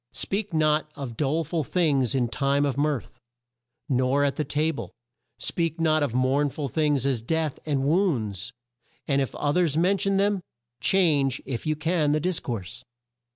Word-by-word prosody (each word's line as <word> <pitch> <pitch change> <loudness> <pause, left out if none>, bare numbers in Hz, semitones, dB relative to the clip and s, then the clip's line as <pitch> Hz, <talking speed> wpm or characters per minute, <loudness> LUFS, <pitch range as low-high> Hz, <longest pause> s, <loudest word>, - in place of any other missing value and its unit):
"Speak 205 +1 -2
not 155 -1 +2
of 135 -5 -6
dole 150 +6 0
ful 160 +1 -2
things 140 -6 +1
in 125 -2 +2
time 140 +5 +1
of 140 -3 -1
mirth, 145 -3 -2 0.7
nor 130 +1 +2
at 140 -1 +1
the 155 - -1
ta 150 +3 0
ble; - - -7 0.5
speak 165 -1 -2
not 155 -1 +3
of 135 -5 -1
mourn 135 +3 +2
ful 140 +1 -4
things, 145 0 +1
as 130 -5 +1
death, 155 +4 -1
and 140 -3 0
wounds, 135 - 0 0.6
and 140 -1 +2
if 135 - -3
o 145 - 0
thers 165 -4 +2
men 185 +4 +3
tion 195 0 +1
them, 200 -1 +2 0.4
change, 145 -5 +3
if 130 +3 -4
you 155 - +1
can, 160 -1 +1
the 155 - +2
dis 180 +2 -1
course. 115 0 -6
145 Hz, 175 wpm, -26 LUFS, 135-160 Hz, 0.7 s, not